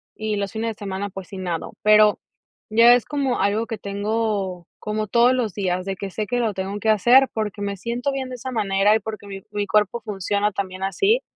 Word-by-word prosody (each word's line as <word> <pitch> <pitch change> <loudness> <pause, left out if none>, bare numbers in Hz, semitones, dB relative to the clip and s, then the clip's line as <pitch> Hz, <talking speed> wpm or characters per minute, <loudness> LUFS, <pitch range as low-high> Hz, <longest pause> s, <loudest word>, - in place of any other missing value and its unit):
y 215 -1 -2
los 200 -1 -2
fines 225 +1 -2
de - - -6
semana, 200 0 -4
pues, 190 -1 -9
si 195 - -9
nado, 175 -3 -4
pero, 215 0 +5 0.5
ya 230 +2 +7
es 245 -2 +3
como 275 -4 -1
algo 205 +3 +1
que 225 -3 -6
tengo 200 -3 -2
como 215 0 -3
todos 240 +4 +4
los 240 -6 -1
días, 185 -2 -1
de 195 0 -3
que 195 +1 -6
sé 210 +2 -3
que 245 - -1
lo 225 -3 0
tengo 195 +2 -4
que 220 - 0
hacer, 240 +6 +6
porque, 215 -2 -3
me 200 0 -3
siento 235 +7 -2
bien 265 -1 -4
de 255 - -6
esa 255 +2 -6
manera 205 -2 +2
y - - +2
porque, 215 -2 -7
mi 195 -1 -8
mi 205 -1 -1
cuerpo 210 +3 +1
funciona 205 0 -1
también 190 -1 -4
así. 395 - +2
210 Hz, 220 wpm, -22 LUFS, 195-230 Hz, 0.5 s, ya